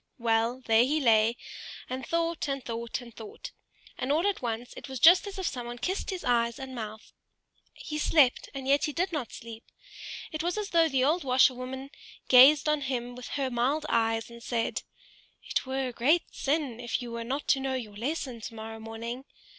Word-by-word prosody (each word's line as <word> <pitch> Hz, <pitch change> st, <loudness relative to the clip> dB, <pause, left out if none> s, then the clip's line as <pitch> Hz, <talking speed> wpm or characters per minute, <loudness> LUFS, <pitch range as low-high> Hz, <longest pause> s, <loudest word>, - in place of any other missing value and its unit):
Well, 230 Hz, +1 st, +1 dB
there 225 Hz, +1 st, +5 dB
he 295 Hz, +5 st, +1 dB
lay, 230 Hz, -3 st, +4 dB, 0.5 s
and 260 Hz, +1 st, -4 dB
thought 335 Hz, +2 st, -1 dB
and 275 Hz, -2 st, -3 dB
thought, 235 Hz, +1 st, -4 dB
and 235 Hz, +3 st, -9 dB
all 320 Hz, +5 st, +2 dB
at 405 Hz, -1 st, 0 dB
once 235 Hz, 0 st, -4 dB
it -, -, -9 dB
was 265 Hz, -1 st, -5 dB
just 350 Hz, -, +7 dB
as 400 Hz, 0 st, -7 dB
if 380 Hz, -, -3 dB
someone 240 Hz, -5 st, -4 dB
kissed 370 Hz, +10 st, -2 dB
his 375 Hz, -3 st, -4 dB
eyes 235 Hz, -1 st, +1 dB
and 265 Hz, -1 st, -7 dB
mouth: 220 Hz, -2 st, -7 dB, 0.6 s
he 305 Hz, 0 st, -5 dB
slept, 290 Hz, -4 st, +3 dB
and 265 Hz, -1 st, -5 dB
yet 280 Hz, +1 st, +3 dB
he 300 Hz, -, -3 dB
did 365 Hz, +4 st, 0 dB
not 290 Hz, -8 st, -3 dB
sleep; 230 Hz, 0 st, -9 dB, 0.7 s
it 310 Hz, -, -3 dB
was 350 Hz, +4 st, -1 dB
as 420 Hz, -1 st, -3 dB
though 330 Hz, -1 st, +4 dB
the 265 Hz, -2 st, +2 dB
old 320 Hz, +6 st, +2 dB
washerwoman 260 Hz, +1 st, +1 dB, 0.4 s
gazed 270 Hz, +4 st, +8 dB
on 300 Hz, -1 st, +2 dB
him 245 Hz, -3 st, -3 dB
with 250 Hz, 0 st, -9 dB
her 270 Hz, -2 st, -1 dB
mild 265 Hz, +6 st, 0 dB
eyes 225 Hz, 0 st, +1 dB
and 235 Hz, 0 st, -11 dB
said, 230 Hz, -1 st, -1 dB, 0.6 s
"It -, -, -2 dB
were 265 Hz, 0 st, -1 dB
a -, -, -9 dB
great 295 Hz, +9 st, +3 dB
sin 280 Hz, -5 st, -1 dB
if 240 Hz, -2 st, -2 dB
you 240 Hz, -, -7 dB
were 235 Hz, 0 st, -4 dB
not 270 Hz, +5 st, -3 dB
to 270 Hz, -, +4 dB
know 265 Hz, 0 st, -1 dB
your 220 Hz, -5 st, -6 dB
lesson 255 Hz, 0 st, -3 dB
tomorrow 225 Hz, 0 st, -7 dB
morning. 230 Hz, +3 st, -6 dB
255 Hz, 190 wpm, -28 LUFS, 235-295 Hz, 0.7 s, gazed